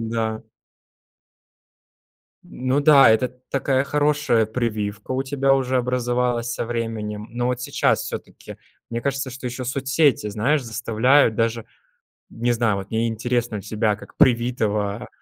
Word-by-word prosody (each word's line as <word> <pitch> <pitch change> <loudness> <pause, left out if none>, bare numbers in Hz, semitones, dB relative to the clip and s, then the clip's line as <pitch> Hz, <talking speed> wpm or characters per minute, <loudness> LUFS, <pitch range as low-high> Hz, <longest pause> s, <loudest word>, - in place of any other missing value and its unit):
Да. 110 -1 -2 2.0
Ну 130 +2 -1
да, 140 -5 +7
это 110 +3 +3
т 125 - -26
такая 135 0 +1
хорошая 145 -6 +1
прививка 110 -2 -3
у 130 +1 0
тебя 135 0 +1
уже 130 -1 0
образовалась 125 -1 0
со - - -3
временем, 115 -2 -4
но 120 +1 -2
вот 125 0 -1
сейчас - - +1
всё-таки - - -8 0.3
мне 115 0 -3
кажется, 140 -1 -2
что 130 0 -7
ещё 125 +1 -5
соцсети, 135 -2 +1
знаешь, 130 +8 +1
заставляют 115 +2 +2
даже, 115 0 -1 0.7
не 120 +1 -1
знаю, 115 -3 +1
вот 100 0 -7
мне 115 +1 0
интересно 120 0 -2
у - - -6
тебя, 105 0 -1
как - - -15
привитого 115 -3 +1
120 Hz, 140 wpm, -22 LUFS, 110-130 Hz, 2.0 s, да